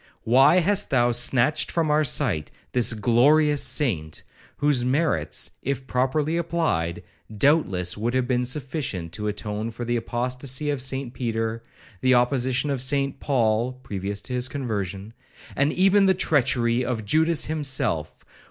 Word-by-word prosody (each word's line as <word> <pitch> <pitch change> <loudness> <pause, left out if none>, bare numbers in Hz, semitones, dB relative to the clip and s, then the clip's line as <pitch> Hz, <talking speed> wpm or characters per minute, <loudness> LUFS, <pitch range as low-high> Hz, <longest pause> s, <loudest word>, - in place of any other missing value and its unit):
Why 135 +9 +5
hast 205 +3 +1
thou 120 -2 +2
snatched 120 +4 +1
from 160 -3 0
our 150 +1 +3
sight 115 - 0 0.2
this 125 -2 +2
glorious 140 +7 +3
saint, 85 - 0 0.3
whose 145 -4 +1
merits, 125 - 0
if 135 0 -3
properly 140 +6 0
applied, 160 - -1 0.3
doubtless 100 - +2
would 115 +4 -2
have 130 -1 0
been 125 -1 0
sufficient 130 - -3
to 105 +3 -4
atone 105 +1 -4
for 120 +1 -7
the 120 0 0
apostacy 125 +5 -2
of 140 -3 -3
St 130 -1 -2
Peter, 115 -2 -3 0.4
the 130 0 +4
opposition 130 +2 +1
of 135 -3 -2
St 140 +1 0
Paul, 120 -2 0
(previous 100 +1 -5
to 125 - -6
his 125 0 -1
conversion), 105 -6 -5 0.4
and 140 +2 +1
even 195 +2 +3
the 190 - +3
treachery 125 -7 +1
of 120 -4 -3
Judas 160 +8 +2
himself? 135 - -2
125 Hz, 145 wpm, -24 LUFS, 115-145 Hz, 0.4 s, Why